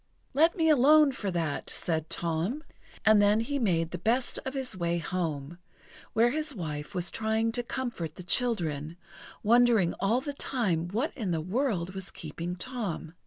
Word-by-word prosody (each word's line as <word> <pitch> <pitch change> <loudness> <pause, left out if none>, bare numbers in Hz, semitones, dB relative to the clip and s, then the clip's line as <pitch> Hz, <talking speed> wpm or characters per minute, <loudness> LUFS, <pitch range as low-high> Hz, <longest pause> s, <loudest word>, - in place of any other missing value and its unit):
"Let 320 +5 +4
me 325 -1 +3
alone 300 0 +6
for 210 -6 -4
that!" 165 -5 -2
said 160 -2 -2
Tom. 170 - -1 0.4
And 215 -1 +7
then 205 +1 +4
he 280 +5 -2
made 170 -8 +1
the - - -4
best 240 +3 0
of 265 +1 -4
his 265 -6 -3
way 170 -1 0
home, 165 -2 -3 0.5
where 235 +2 +4
his 305 -1 -2
wife 150 -1 -5
was 175 -1 -2
trying 220 +1 0
to 245 +1 -1
comfort 235 - -4
the 180 - -9
children, 170 - -1 0.5
wondering 230 -5 +4
all 215 +6 +2
the 285 +2 -5
time 200 -12 -1
what 230 - -2
in 220 -8 -3
the 165 -2 0
world 185 - -1
was 190 -1 -6
keeping 165 +3 -6
Tom. 190 -7 -4
205 Hz, 165 wpm, -29 LUFS, 170-245 Hz, 0.5 s, And